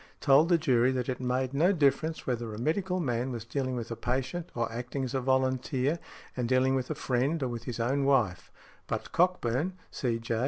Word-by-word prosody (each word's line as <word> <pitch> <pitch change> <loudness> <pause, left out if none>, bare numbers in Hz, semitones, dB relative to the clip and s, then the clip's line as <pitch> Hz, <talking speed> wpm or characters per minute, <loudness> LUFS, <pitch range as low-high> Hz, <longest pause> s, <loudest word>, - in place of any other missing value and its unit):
told 145 +4 +5
the 175 - +5
jury 130 -6 +3
that 125 -2 -2
it 130 - -2
made 130 +1 -1
no 165 +7 +4
difference 160 -1 +1
whether 120 -3 -2
a - - -7
medical 180 +7 0
man 125 -4 -1
was 115 -2 -5
dealing 130 +1 -2
with 120 -1 -5
a - - -2
patient 130 +9 -2
or 115 -1 -1
acting 125 +4 -4
as 130 - -4
a 135 - 0
volunteer, 130 +3 +1 0.4
and 125 -2 -2
dealing 130 +1 +3
with 130 -2 -1
a 155 - -2
friend 135 +3 0
or - - 0
with 120 -1 -5
his 120 -2 -4
own 135 +4 +1
wife. 115 -10 +1 0.4
But - - -4
Cockburn, 175 -2 +1 0.2
C.J. 115 -2 -1
130 Hz, 200 wpm, -29 LUFS, 120-140 Hz, 0.4 s, told